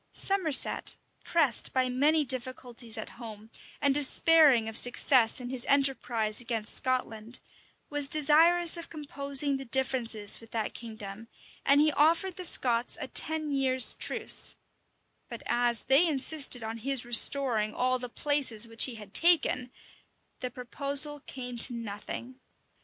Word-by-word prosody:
Somerset, 370 -8 +1 0.3
pressed 300 -9 0
by 260 -1 0
many 295 +5 0
difficulties 250 -2 -2
at 220 - -9
home 220 -1 -11 0.3
and 280 -2 +1
despairing 290 -3 +4
of 225 - -7
success 245 0 +2
in 250 0 -8
his 255 -2 -3
enterprise 250 -6 0
against 230 -3 -1
Scotland, 245 -3 -2 0.5
was 290 -1 -2
desirous 325 +4 +3
of 335 - -9
composing 280 -2 -1
the 270 - -10
differences 235 -5 0
with 225 - -16
that 220 -2 -4
kingdom, 220 -2 -9 0.4
and 280 +1 +3
he 305 +1 +2
offered 330 +5 0
the 365 - -8
Scots 245 -7 +1
a - - -6
ten 315 -2 -2
years' 260 -2 +3
truce; - - +1 0.7
but - - -10
as 240 -1 0
they 285 +6 +4
insisted 280 -4 0
on 225 +1 -6
his 265 +1 -1
restoring 240 -2 +1
all 255 0 -1
the 250 0 -8
places 255 -5 0
which 225 0 +1
he 255 - -5
had 210 -3 -13
taken, 305 -7 +3 0.7
the 250 - -5
proposal 280 +4 0
came 250 -2 -8
to 245 - +4
nothing. 235 +3 -9
255 Hz, 140 wpm, -27 LUFS, 230-290 Hz, 0.7 s, despairing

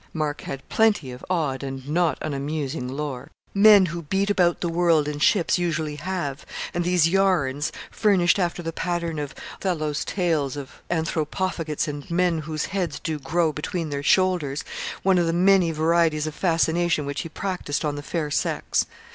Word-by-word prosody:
Mark 150 -2 -2
had 135 -1 -7
plenty 210 -12 +2
of 125 - -10
odd 155 -7 0
and 135 -1 -6
not 165 +2 +1
unamusing 145 -2 -3
lore. 140 0 -5 0.2
Men 205 -1 +7
who 170 -1 -4
beat 195 +6 0
about 175 -4 +2
the 175 - -1
world 165 -3 +2
in 150 -1 -3
ships 180 +3 +3
usually 155 -3 -1
have; 155 -4 -3 0.3
and 175 - 0
these 175 -2 +3
'yarns,' 165 -7 +1 0.2
furnished, 195 -3 +3
after 175 -1 -1
the 165 0 -4
pattern 170 -3 -2
of 145 -2 -5 0.2
Othello's 155 -6 -1
tales 160 -7 0
of 140 -2 -9
Anthropophagites 160 -1 -1
and 145 -1 -6
men 175 -1 +2
whose 155 0 -3
heads 175 -7 -1
do 155 -2 -3
grow 160 +3 +1
beneath 160 +1 -3
their 140 0 -2
shoulders, 175 -4 +2 0.4
one 190 -1 +4
of 170 - +2
the 165 - +1
many 185 0 +4
varieties 160 -1 +2
of 155 - -4
fascination 165 -2 +1
which 140 0 -3
he 165 - -7
practised 175 -4 -3
on 150 - 0
the 145 - -5
fair 150 0 -3
sex. - - 0
165 Hz, 170 wpm, -24 LUFS, 145-175 Hz, 0.4 s, Men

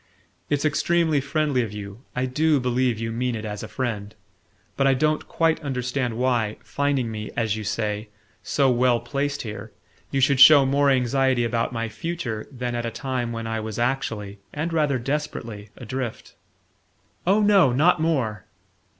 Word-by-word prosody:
"It's 145 0 0
extremely 160 0 +2
friendly 140 -2 0
of 115 -4 -3
you 105 +1 -8
I 125 +1 0
DO 150 +3 +2
believe 125 -1 +1
you 115 0 -3
mean 125 +1 -1
it 110 0 -5
as 105 -1 -5
a - - -6
friend 110 -5 -4 0.6
but 135 - +2
I 135 - +4
don't 155 +3 0
quite 165 -1 +1
understand 125 -3 -2
why, 120 -4 0
finding 140 -5 -1
me, 110 -1 -5
as 115 -2 +1
you 110 - -5
say, 105 +1 -2 0.3
so 135 -3 +2
well 125 -1 +3
placed 145 +2 -2
here, 110 -1 -7 0.4
you 135 - -1
should 135 0 +3
show 140 +1 +9
more 140 +1 +3
anxiety 130 -1 +2
about 115 0 0
my 115 -1 -2
future 120 -5 -4
than 125 -2 -4
at 120 0 -2
a 115 - -2
time 120 0 -3
when 115 -1 -4
I 115 0 -2
was 110 -1 -5
actually, 115 -5 -2
and 160 +3 -3
rather 150 -4 +2
desperately, 120 -6 -4
adrift." 125 -1 -5 0.9
"Oh, 200 +3 +4
no, 200 -9 +5
not 155 +6 +3
more!" 110 - -1
125 Hz, 165 wpm, -24 LUFS, 115-140 Hz, 0.9 s, show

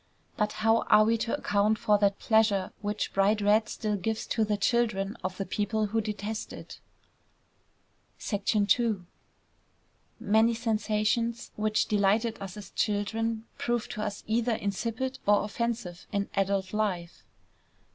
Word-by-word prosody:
But 210 0 0
how 225 +1 +5
are 215 0 +7
we 225 +1 +3
to 230 +5 -1
account 205 -3 +1
for 210 -3 +3
that 200 -1 +2
pleasure 215 -4 +2
which 210 0 -2
bright 200 +2 +3
red 210 +1 +3
still 215 -1 -2
gives 220 +4 -2
to 225 - +2
the 210 -1 0
children 210 -1 +1
of 185 0 -3
the 195 - -2
people 215 +2 -1
who 225 +2 0
detest 210 0 -4
it? - - -10 1.5
II 210 +3 +2 1.3
Many 220 +3 +3
sensations 225 +1 0
which 215 0 +1
delighted 210 +2 +1
us 195 0 -7
as 205 - -9
children, 220 +2 -1
prove 240 -2 -1
to 215 - -5
us 205 -1 -4
either 230 +1 +1
insipid 230 +7 -3
or 205 0 +5
offensive 215 -4 -3
in 200 -2 -1
adult 195 0 0
life. 185 -5 -2
215 Hz, 135 wpm, -28 LUFS, 200-225 Hz, 1.5 s, are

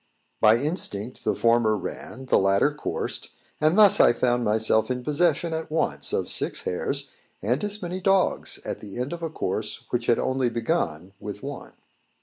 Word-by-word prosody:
By 110 +1 +6
instinct 125 - -3
the - - +1
former 115 -2 +3
ran, 130 +5 -7
the - - +3
latter 100 +9 +2
coursed: 150 - -4 0.3
and 155 +5 +2
thus 210 -3 +7
I - - +6
found 120 0 +1
myself 110 +1 +2
in 125 -1 -2
possession 165 +2 +1
at 160 0 -4
once 160 +1 0
of - - -1
six - - +1
hares, 140 +9 -3 0.3
and 125 - -1
as 210 -1 -4
many 180 +2 -4
dogs, 195 0 +1
at - - -4
the 105 0 -9
end 130 +6 -3
of 170 - -7
a 165 - -3
course 105 -7 -3
which 120 -1 -1
had 120 - +4
only 130 -1 0
begun 100 - -2
with 105 0 -8
one. 140 0 -7
130 Hz, 175 wpm, -25 LUFS, 110-160 Hz, 0.3 s, thus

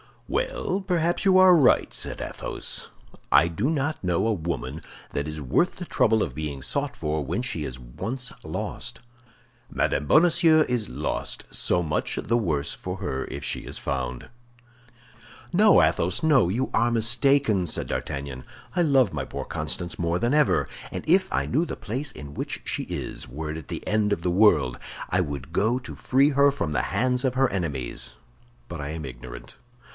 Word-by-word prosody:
"Well, - - -1
perhaps 175 0 0
you 190 -1 +6
are 185 -1 +8
right," 145 -8 +4
said - - -4
Athos. - - -1 0.4
"I 85 - +6
do 100 - -1
not 155 0 -1
know 90 +2 +1
a 115 - +2
woman 80 - -4 0.3
that 70 +1 -2
is 75 0 -5
worth 70 - +1
the 180 - -6
trouble 110 -8 +2
of 65 - -4
being 70 -1 -5
sought - - -2
for 75 0 -2
when 115 - -2
she 85 -12 -2
is 65 -2 -6
once 110 - -5
lost. - - -5 0.7
Madame 75 - 0
Bonacieux 160 - +5
is 120 -4 -1
lost; - - -3
so 90 - +1
much 75 -2 -1
the 115 +2 0
worse 75 -10 -1
for - - -6
her 65 0 -3
if 70 +1 -7
she - - -1
is - - -6
found." 65 -2 -3 1.2
"No, 205 +4 +6
Athos, - - +1
no, 145 - +5
you 125 +8 -1
are 120 +1 +3
mistaken," 120 -3 +3
said - - -1
D'Artagnan; 70 -3 -4 0.3
"I 175 - +2
love 135 - +3
my - - -3
poor - - -5
Constance 85 +2 -3
more 85 0 +1
than 120 +7 0
ever, 150 -1 +3 0.2
and - - -5
if 185 +3 +3
I - - +1
knew 155 +7 +1
the - - -5
place 130 +7 -4
in 70 -1 -10
which - - -4
she - - -2
is, - - -4
were 75 +5 -5
it 80 - -5
at 80 - -9
the - - -6
end 105 -1 +1
of 95 - -3
the 90 - +1
world, 85 - +4 0.3
I 90 - +2
would 70 -3 -5
go 110 +8 +2
to 125 - -9
free 135 +3 +3
her 140 0 +4
from 80 - -3
the 75 - 0
hands 125 +1 +1
of 130 -1 0
her 135 0 +3
enemies; 75 -10 -3 0.6
but 85 - -6
I 70 +1 -4
am 80 -2 -5
ignorant. - - -10
105 Hz, 180 wpm, -25 LUFS, -, 1.2 s, are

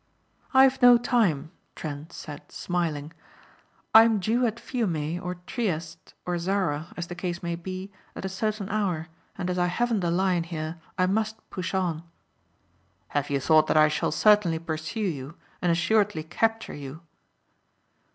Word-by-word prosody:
"I've 265 0 +5
no 245 -1 +9
time," 215 - +1 0.2
Trent 150 0 -6
said 145 -2 -9
smiling. 165 -4 -2 0.8
"I 220 - +11
am 225 -2 +3
due 235 +6 +2
at 230 +1 -4
Fiume 175 - -2
or 180 +1 -4
Trieste 170 -10 -4
or 175 -1 -1
Zara 170 -4 -1
as 175 - -3
the 175 - -7
case 175 -1 -4
may 170 0 -1
be 185 +3 -6 0.2
at - - -6
a - - 0
certain 210 +1 -2
hour 185 -6 -1 0.3
and 180 -3 -3
as 180 0 -1
I 180 - +3
haven't 230 +5 0
the 175 -2 0
Lion 180 -1 +1
here 165 -1 -5 0.2
I 185 - +3
must 215 +3 -1
push 185 +1 -3
on." 175 -4 0 1.1
"Have 145 -1 -1
you 140 -1 +1
thought 155 +2 +4
that - - +2
I 155 0 +6
shall 150 - 0
certainly 190 0 +4
pursue 160 +4 -4
you 155 -6 -3 0.3
and 175 - +2
assuredly 185 0 +2
capture 225 +7 -1
you?" 145 +2 -8
180 Hz, 160 wpm, -26 LUFS, 160-210 Hz, 1.1 s, I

